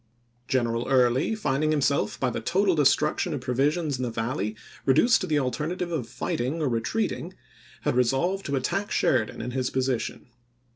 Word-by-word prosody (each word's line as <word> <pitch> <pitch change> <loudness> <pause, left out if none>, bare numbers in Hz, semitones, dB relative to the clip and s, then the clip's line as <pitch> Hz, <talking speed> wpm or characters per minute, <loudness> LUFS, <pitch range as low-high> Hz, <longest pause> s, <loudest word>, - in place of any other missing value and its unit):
General 120 -2 0
Early, 130 - +3
finding 150 -6 0
himself 145 -2 +1
by 130 -2 +1
the 110 - -4
total 190 - +2
de 150 -4 +4
struction 150 +3 +1
of 135 - -5
provisions 140 +4 0
in 130 - -3
the 125 - -1
Valley 110 -2 -2 0.3
reduced 155 - +4
to - - -2
the 155 - +1
alternative 155 +6 -2
of 130 -9 -3
fighting 130 +7 -2
or 155 - 0
retreating, 165 - -2 0.5
had - - 0
resolved 135 +11 +1
to 140 - -1
attack 195 +10 -1
Sheridan 120 -5 +1
in 125 - -4
his 130 0 -1
position. 130 -2 -2
135 Hz, 165 wpm, -26 LUFS, 125-160 Hz, 0.5 s, de